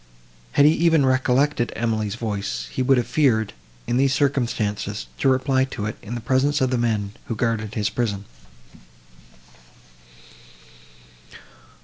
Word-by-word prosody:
Had 145 - +5
he 150 - +7
even 160 -3 +3
recollected 130 0 +2
Emily's 110 -2 -1
voice, 100 - -4
he - - -2
would 130 +1 +4
have 120 - +1
feared, 115 -6 +1 0.3
in 120 - 0
these 135 0 +3
circumstances, 115 - -1
to - - +3
reply 130 0 +2
to 120 -6 -5
it, 105 - -3
in 115 +3 -6
the 120 - -5
presence 135 +5 +1
of 130 -2 +1
the 125 - +1
men, 110 -4 0
who 115 - -4
guarded 110 -2 -2
his 105 -2 0
prison. 105 -5 -2
120 Hz, 135 wpm, -23 LUFS, 110-135 Hz, 0.3 s, he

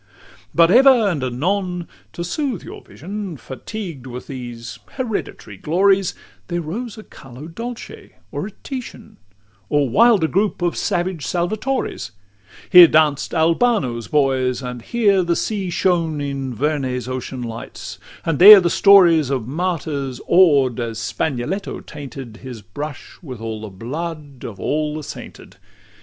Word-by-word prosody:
LXXI - - -26
But 170 +1 +5
ever 265 +5 +7 0.2
and 150 -8 -2
anon, 180 +7 -2 0.3
to 170 - -5
soothe 250 - -3
your - - -10
vision, 195 -2 -7
Fatigued 140 - -8
with 125 0 -8
these 120 -3 -8 0.2
hereditary 225 - -5
glories, 190 - +2 0.3
There 175 -1 -2
rose 210 +8 -5
a 215 - -9
Carlo 135 -2 -12
Dolce 230 +8 -8 0.2
or 195 - -4
a - - -10
Titian, 260 -3 -8 0.5
Or 145 -2 +2
wilder 205 - +4
group 195 +1 0
of 175 - 0
savage 175 -3 -2
Salvatore's; 180 - -2 0.6
Here 180 -1 +11
danced 155 0 +2
Albano's 160 - +1
boys, 135 -3 +1
and 125 -1 -6
here 200 - +2
the 170 -1 0
sea 200 -2 -2
shone 170 -4 0
In 135 -3 -4
Vernet's 130 -2 -1
ocean 130 0 -5
lights; 115 -1 -8 0.3
and 165 -4 -1
there 205 +2 +11
the 175 -2 0
stories 175 -8 +6
Of 130 -5 -2
martyrs 145 -4 -3
awed, 140 -9 +4
as 115 -2 -4
Spagnoletto 140 - -3
tainted 135 -6 -9
His 125 -5 -9
brush 145 +7 -8
with 130 - -8
all 110 -1 -5
the 110 - -7
blood 145 - -7
of 105 - -8
all 150 0 -1
the 155 - -5
sainted. - - -10
155 Hz, 140 wpm, -20 LUFS, 130-185 Hz, 0.6 s, Here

